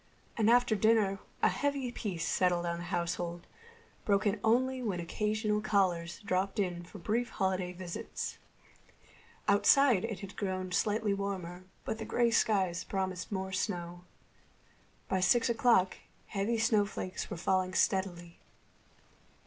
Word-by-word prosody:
And 220 Hz, -1 st, +3 dB
after 245 Hz, -1 st, +4 dB
dinner 210 Hz, -2 st, +3 dB, 0.2 s
a -, -, +6 dB
heavy 280 Hz, -3 st, -1 dB
peace 190 Hz, -9 st, -3 dB
settled 175 Hz, -1 st, +2 dB
on 170 Hz, 0 st, -2 dB
the 175 Hz, -, -6 dB
household, 175 Hz, -1 st, -3 dB, 0.6 s
broken 205 Hz, +1 st, +1 dB
only 255 Hz, +3 st, +2 dB
when 205 Hz, -7 st, -2 dB
occasional 210 Hz, +4 st, -1 dB
callers 180 Hz, -5 st, 0 dB
dropped 195 Hz, 0 st, -1 dB
in 180 Hz, -4 st, -1 dB
for 175 Hz, -, -11 dB
brief 230 Hz, +7 st, -1 dB
holiday 185 Hz, -2 st, -1 dB
visits. 180 Hz, -1 st, -6 dB, 1.1 s
Outside 235 Hz, +2 st, +5 dB
it 215 Hz, -4 st, -5 dB
had 200 Hz, 0 st, -8 dB
grown 185 Hz, -2 st, -3 dB
slightly 210 Hz, +2 st, +1 dB
warmer, 185 Hz, -3 st, -4 dB, 0.2 s
but 220 Hz, -, -3 dB
the -, -, -4 dB
gray 240 Hz, -1 st, +2 dB
sky 195 Hz, -6 st, +2 dB, 0.2 s
promised 190 Hz, -1 st, -3 dB
more 190 Hz, -1 st, -3 dB
snow. 175 Hz, -2 st, -3 dB, 1.0 s
By 190 Hz, -, 0 dB
six 235 Hz, +5 st, +3 dB
o'clock 225 Hz, -5 st, +3 dB, 0.3 s
heavy 210 Hz, +3 st, 0 dB
snowflakes 210 Hz, -4 st, 0 dB
were 190 Hz, -, -5 dB
falling 185 Hz, +1 st, 0 dB
steadily. 175 Hz, -3 st, 0 dB
195 Hz, 130 wpm, -31 LUFS, 180-220 Hz, 1.1 s, a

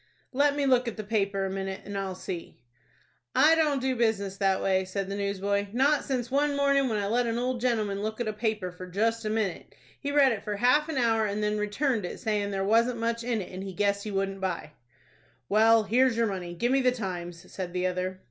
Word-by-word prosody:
"Let 285 Hz, +2 st, +3 dB
me 285 Hz, -1 st, 0 dB
look 255 Hz, -2 st, +3 dB
at 225 Hz, -1 st, -5 dB
a -, -, -2 dB
paper 200 Hz, -2 st, 0 dB
a -, -, -2 dB
minute, 195 Hz, 0 st, -4 dB
and 205 Hz, -, -6 dB
I'll 195 Hz, -1 st, -3 dB
see." 180 Hz, -2 st, -7 dB, 0.8 s
"I 300 Hz, +4 st, +6 dB
don't 305 Hz, -4 st, +2 dB
do 260 Hz, 0 st, 0 dB
business 215 Hz, -5 st, 0 dB
that 195 Hz, -1 st, +2 dB
way," 190 Hz, -1 st, +1 dB
said 190 Hz, +1 st, -4 dB
the -, -, -2 dB
newsboy; 200 Hz, 0 st, -1 dB
"not 275 Hz, +4 st, +3 dB
since 250 Hz, -2 st, -3 dB
one 285 Hz, +1 st, +2 dB
morning 280 Hz, -1 st, +3 dB
when 220 Hz, -, 0 dB
I 205 Hz, -, -1 dB
let 235 Hz, +4 st, +1 dB
an 230 Hz, 0 st, -1 dB
old 250 Hz, 0 st, -1 dB
gentleman 215 Hz, -5 st, 0 dB
look 215 Hz, +2 st, -3 dB
at 240 Hz, -, -1 dB
a 215 Hz, -, -1 dB
paper 215 Hz, -4 st, -2 dB, 0.2 s
just 225 Hz, +4 st, +1 dB
for 220 Hz, -, -4 dB
a -, -, -1 dB
minute. 215 Hz, -5 st, -2 dB, 0.2 s
He 285 Hz, -, -3 dB
read 285 Hz, -2 st, +5 dB
it 215 Hz, -3 st, -3 dB
for 210 Hz, -1 st, -3 dB
half 250 Hz, +8 st, +3 dB
an 315 Hz, -, -2 dB
hour, 225 Hz, -3 st, +2 dB
and 205 Hz, +1 st, -2 dB
then 210 Hz, 0 st, 0 dB
returned 215 Hz, +2 st, 0 dB
it, 175 Hz, -, -5 dB
sayin' 210 Hz, -2 st, -1 dB
there 195 Hz, -1 st, -2 dB
wasn't 230 Hz, +4 st, +3 dB
much 230 Hz, 0 st, -1 dB
in 235 Hz, -3 st, -1 dB
it, -, -, -12 dB
and 185 Hz, 0 st, -6 dB
he 195 Hz, -1 st, -6 dB
guessed 200 Hz, +2 st, 0 dB
he 215 Hz, -, -5 dB
wouldn't 195 Hz, -1 st, -2 dB
buy." 180 Hz, -5 st, -3 dB, 0.8 s
"Well, 225 Hz, +2 st, +5 dB
here's 235 Hz, +3 st, +3 dB
your 230 Hz, -, +3 dB
money. 180 Hz, -4 st, -4 dB
Give 240 Hz, +7 st, 0 dB
me 270 Hz, 0 st, +3 dB
the 255 Hz, -1 st, +3 dB
'Times,'" 180 Hz, -6 st, -6 dB
said 185 Hz, -2 st, -4 dB
the 180 Hz, 0 st, -1 dB
other. 185 Hz, +1 st, -2 dB
215 Hz, 235 wpm, -28 LUFS, 195-245 Hz, 0.8 s, I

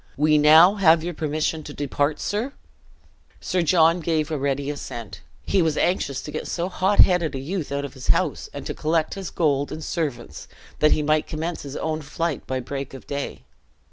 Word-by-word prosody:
"We 150 Hz, +1 st, +4 dB
now 160 Hz, +7 st, +7 dB
have 165 Hz, -4 st, +5 dB
your 175 Hz, +1 st, -3 dB
permission 155 Hz, +1 st, -2 dB
to 145 Hz, -1 st, -9 dB
depart, 145 Hz, +1 st, -1 dB
sir?" 230 Hz, +7 st, -2 dB, 0.9 s
Sir 185 Hz, -1 st, -1 dB
John 165 Hz, 0 st, +4 dB
gave 160 Hz, -2 st, -1 dB
a 155 Hz, -, 0 dB
ready 140 Hz, +1 st, -1 dB
assent; 115 Hz, -9 st, -7 dB, 0.2 s
he 195 Hz, -, +2 dB
was 160 Hz, -2 st, +1 dB
anxious 140 Hz, -7 st, 0 dB
to 150 Hz, -, -7 dB
get 155 Hz, -, -5 dB
so 175 Hz, +1 st, -2 dB
hot 190 Hz, +2 st, +3 dB
headed 170 Hz, -5 st, +3 dB
a -, -, -3 dB
youth 160 Hz, +3 st, -4 dB
out 140 Hz, 0 st, -2 dB
of 140 Hz, -, -8 dB
his 130 Hz, -2 st, -9 dB
house, -, -, +1 dB
and -, -, -8 dB
to -, -, -3 dB
collect 160 Hz, 0 st, 0 dB
his 195 Hz, -2 st, -5 dB
gold 145 Hz, -4 st, 0 dB
and 160 Hz, -, -6 dB
servants, 125 Hz, -, -4 dB, 0.3 s
that 150 Hz, -, +5 dB
he 150 Hz, -, -1 dB
might 155 Hz, +1 st, +1 dB
commence 160 Hz, +2 st, -4 dB
his 140 Hz, 0 st, -8 dB
own 160 Hz, 0 st, -2 dB
flight 155 Hz, +1 st, -3 dB
by 130 Hz, 0 st, -2 dB
break 135 Hz, +1 st, -6 dB
of 135 Hz, -, -11 dB
day. 140 Hz, 0 st, -5 dB
155 Hz, 200 wpm, -23 LUFS, 140-170 Hz, 0.9 s, now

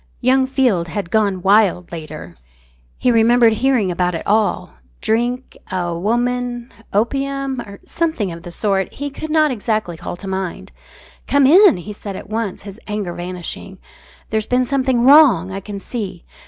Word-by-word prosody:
Young 260 Hz, +1 st, +3 dB
Field 250 Hz, -11 st, +1 dB
had 170 Hz, 0 st, -5 dB
gone 200 Hz, -4 st, +1 dB
wild 195 Hz, -3 st, +3 dB
later, 155 Hz, -, -8 dB, 0.6 s
he 250 Hz, -, +2 dB
remembered 230 Hz, 0 st, +5 dB
hearing 230 Hz, -4 st, +1 dB
about 180 Hz, 0 st, 0 dB
it 165 Hz, -, -5 dB
all 210 Hz, -2 st, 0 dB, 0.3 s
drink, 240 Hz, +3 st, -1 dB, 0.2 s
a 175 Hz, -2 st, -2 dB
woman, 240 Hz, +5 st, -1 dB, 0.2 s
opium, 275 Hz, +4 st, -1 dB
or 200 Hz, -3 st, -11 dB
something 315 Hz, -, -2 dB
of 165 Hz, 0 st, -8 dB
the 175 Hz, -, -9 dB
sort 195 Hz, +1 st, -1 dB
he 285 Hz, +1 st, -4 dB
could 315 Hz, +3 st, -7 dB
not 310 Hz, -1 st, +3 dB
exactly 215 Hz, -6 st, -2 dB
call -, -, -6 dB
to 195 Hz, +2 st, -9 dB
mind. 190 Hz, -2 st, -4 dB, 0.6 s
"Come 285 Hz, -1 st, +4 dB
in," 360 Hz, -, +7 dB
he 205 Hz, +4 st, -7 dB
said 200 Hz, -1 st, -7 dB
at -, -, -9 dB
once, 215 Hz, -4 st, -3 dB
his 200 Hz, +1 st, -10 dB
anger 210 Hz, -4 st, -3 dB
vanishing. 180 Hz, +2 st, -6 dB, 0.5 s
"There's 220 Hz, 0 st, -1 dB
been 250 Hz, 0 st, +2 dB
something 260 Hz, -2 st, +1 dB
wrong, 260 Hz, -, +6 dB
I 195 Hz, -, -4 dB
can 200 Hz, 0 st, -7 dB
see. 195 Hz, -5 st, -6 dB
215 Hz, 160 wpm, -19 LUFS, 185-255 Hz, 0.6 s, in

